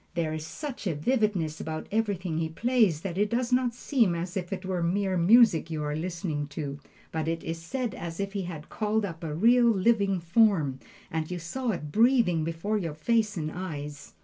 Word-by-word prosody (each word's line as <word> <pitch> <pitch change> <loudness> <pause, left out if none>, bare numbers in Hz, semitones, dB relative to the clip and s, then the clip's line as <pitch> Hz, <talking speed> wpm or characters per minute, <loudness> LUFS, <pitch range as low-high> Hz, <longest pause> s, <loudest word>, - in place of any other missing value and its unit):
There 160 -2 0
is 155 0 -5
such 270 - -6
a 165 - 0
vividness 185 - 0
about 155 0 -4
everything 195 -7 -1
he 160 -1 -1
plays 215 -3 +2
that 185 0 -4
it 205 0 +2
does 245 +2 0
not 250 -2 +2
seem 230 -9 +2
as 175 +3 -4
if 180 -2 -3
it 190 -1 -4
were 185 -2 -1
mere 190 +3 +1
music 185 -2 +5
you 155 -2 -3
are 150 0 -2
listening 165 -3 -3
to, 145 -2 -4 0.3
but 160 -1 -2
it 165 0 -2
is 165 +8 -6
as 200 -10 -3
if 200 0 -2
he 200 - -1
had 170 -4 -7
called 215 0 0
up 170 -3 -7
a 155 -2 -3
real, 235 +6 +5
living 200 -2 +2
form, 170 - +3 0.3
and 160 -1 -2
you 180 - -3
saw 230 +10 -3
it 150 -8 -3
breathing 225 - +4
before 165 +7 -1
your 165 -5 -4
face 215 +5 +1
and 155 -1 -2
eyes. 150 -5 -6
180 Hz, 200 wpm, -28 LUFS, 160-215 Hz, 0.3 s, music